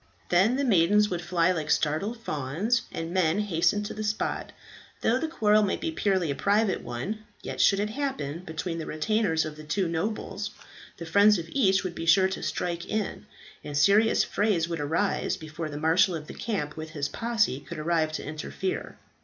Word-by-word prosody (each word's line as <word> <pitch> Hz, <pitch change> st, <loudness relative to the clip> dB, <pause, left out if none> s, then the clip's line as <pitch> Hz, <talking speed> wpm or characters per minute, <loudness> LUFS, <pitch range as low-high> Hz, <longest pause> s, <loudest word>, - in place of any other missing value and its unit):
Then 190 Hz, +8 st, +4 dB
the 280 Hz, -, 0 dB
maidens 210 Hz, -2 st, +4 dB
would 175 Hz, -1 st, -2 dB
fly 175 Hz, 0 st, +2 dB
like 155 Hz, -4 st, -3 dB
startled 165 Hz, +10 st, 0 dB
fawns, 195 Hz, -, -1 dB
and 165 Hz, +1 st, -5 dB
men 180 Hz, -2 st, +2 dB
hasten 200 Hz, 0 st, +1 dB
to 210 Hz, -, -5 dB
the 215 Hz, -, -5 dB
spot; 210 Hz, 0 st, -2 dB, 0.5 s
though 245 Hz, +3 st, +2 dB
the 320 Hz, -, -1 dB
quarrel 215 Hz, -9 st, +3 dB
might 200 Hz, -2 st, 0 dB
be 330 Hz, -, -2 dB
purely 190 Hz, -, +1 dB
a -, -, -2 dB
private 205 Hz, +3 st, +1 dB
one, 160 Hz, -, -4 dB, 0.2 s
yet -, -, -3 dB
should 195 Hz, -, +4 dB
it 210 Hz, +1 st, -1 dB
happen 265 Hz, -, -3 dB
between 165 Hz, 0 st, -4 dB
the 160 Hz, -, -5 dB
retainers 165 Hz, 0 st, +1 dB
of 155 Hz, 0 st, -8 dB
two 185 Hz, +4 st, 0 dB
nobles, 200 Hz, +3 st, -3 dB, 0.5 s
the 170 Hz, -, -7 dB
friends 200 Hz, +5 st, +5 dB
of 170 Hz, -, -4 dB
each 195 Hz, -8 st, +3 dB
would 185 Hz, -2 st, -3 dB
be 165 Hz, -1 st, -6 dB
sure 190 Hz, +2 st, +5 dB
to 190 Hz, -, -5 dB
strike 170 Hz, -1 st, -3 dB
in, 215 Hz, -2 st, -3 dB, 0.4 s
and 145 Hz, -1 st, -4 dB
serious 205 Hz, +8 st, +4 dB
frays 200 Hz, -6 st, +1 dB
would 170 Hz, -2 st, -3 dB
arise 160 Hz, +7 st, 0 dB
before 155 Hz, 0 st, -6 dB
the 145 Hz, -, -6 dB
marshal 165 Hz, +4 st, +3 dB
of 155 Hz, -2 st, -6 dB
the -, -, -9 dB
camp 175 Hz, -10 st, -3 dB
with 155 Hz, 0 st, -6 dB
his 145 Hz, -3 st, -2 dB
posse 220 Hz, -, 0 dB
could 140 Hz, -, -9 dB
arrive 160 Hz, 0 st, +1 dB
to -, -, -4 dB
interfere. 155 Hz, +5 st, -4 dB
185 Hz, 190 wpm, -27 LUFS, 160-210 Hz, 0.5 s, friends